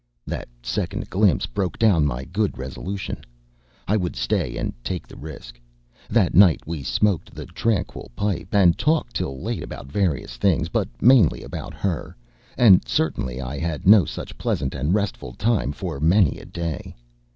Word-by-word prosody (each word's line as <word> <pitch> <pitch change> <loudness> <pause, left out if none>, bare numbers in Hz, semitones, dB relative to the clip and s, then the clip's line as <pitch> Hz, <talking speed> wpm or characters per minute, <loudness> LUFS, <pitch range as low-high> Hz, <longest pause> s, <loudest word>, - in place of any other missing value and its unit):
That - - -5 0.2
second - - -3
glimpse - - +3
broke 90 +8 -3
down 95 -10 +4
my 65 -1 -3
good 100 +6 -1
resolution. 90 +10 -5 0.6
I 105 - +3
would 90 -4 -2
stay - - -1
and - - -2
take 90 +4 -3
the - - -13
risk. 60 -6 -10 0.5
That 105 -6 +2
night 95 -3 +6
we 80 -2 -4
smoked 95 +4 0
the - - -7
tranquil 110 -5 -2
pipe, 100 +2 -2
and 95 -4 +4
talked 155 +1 +1
till 65 -1 -3
late - - -3
about 65 - -8
various 90 -7 -1
things, 85 -4 +2
but 110 -3 -1
mainly 120 - +5
about - - -7
her; 90 -10 -3 0.4
and 100 -7 +7
certainly 65 -5 -1
I 65 +2 -4
had 80 -2 -2
had - - -4
no 105 -1 +8
such - - -7
pleasant 65 - -1
and 70 +4 -1
restful 100 -11 -1
time 105 - 0
for 70 -1 -5
many 85 +1 +3
a - - -12
day. 85 -3 -5
85 Hz, 165 wpm, -23 LUFS, 70-100 Hz, 0.6 s, no